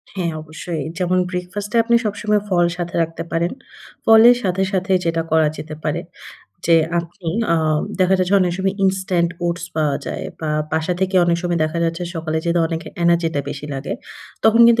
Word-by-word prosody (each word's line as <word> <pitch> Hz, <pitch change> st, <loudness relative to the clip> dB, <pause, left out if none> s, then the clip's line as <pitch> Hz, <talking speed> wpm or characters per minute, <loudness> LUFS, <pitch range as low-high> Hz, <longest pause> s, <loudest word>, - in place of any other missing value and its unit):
হ্যাঁ, 175 Hz, -3 st, -1 dB
অবশ্যই। 155 Hz, 0 st, -5 dB
যেমন 185 Hz, 0 st, +1 dB
ব্রেকফাস্ট 185 Hz, +3 st, -4 dB
এ -, -, +5 dB
আপনি 235 Hz, +1 st, +3 dB
সবসময় 210 Hz, 0 st, 0 dB
ফল 175 Hz, -2 st, +3 dB
সাথে 175 Hz, -1 st, -4 dB
রাখতে 165 Hz, 0 st, -5 dB
পারেন। 170 Hz, +1 st, 0 dB, 0.5 s
ফলের 225 Hz, +2 st, +8 dB
সাথে, 190 Hz, 0 st, 0 dB
সাথে 190 Hz, +1 st, -1 dB
যেটা 165 Hz, 0 st, +1 dB
করা 160 Hz, -1 st, +4 dB
যেতে 155 Hz, 0 st, -7 dB
পারে 155 Hz, +2 st, -1 dB, 0.7 s
যে 170 Hz, -, +5 dB, 0.2 s
আপনি 170 Hz, +1 st, -6 dB, 0.2 s
আ -, -, +4 dB, 0.4 s
দেখা 185 Hz, +1 st, +4 dB
যায় 185 Hz, -, +1 dB
যে 200 Hz, -, +4 dB
অনেক 180 Hz, -1 st, +2 dB
সময় 190 Hz, +1 st, 0 dB
ইনস্ট্যান্ট 185 Hz, -3 st, +1 dB, 0.2 s
ওটস 170 Hz, 0 st, -2 dB
পাওয়া 150 Hz, -3 st, +1 dB
যায় -, -, -4 dB, 0.2 s
বা 155 Hz, -1 st, -2 dB, 0.2 s
বাসা 160 Hz, +3 st, 0 dB
থেকে 190 Hz, 0 st, 0 dB
অনেক 170 Hz, -1 st, +2 dB
সময় 175 Hz, -1 st, 0 dB
দেখা 155 Hz, +2 st, -2 dB
যাচ্ছে 165 Hz, +2 st, -2 dB
সকালে 160 Hz, -1 st, -2 dB
যেহেতু 170 Hz, 0 st, +2 dB
অনেকের 165 Hz, 0 st, -5 dB
এনার্জিটা 170 Hz, -3 st, +2 dB
বেশি 145 Hz, +1 st, -6 dB
লাগে, 135 Hz, +1 st, -4 dB, 0.5 s
তখন 220 Hz, +1 st, +5 dB
কিন্তু 235 Hz, -1 st, +5 dB
175 Hz, 180 wpm, -20 LUFS, 165-190 Hz, 0.7 s, ফলের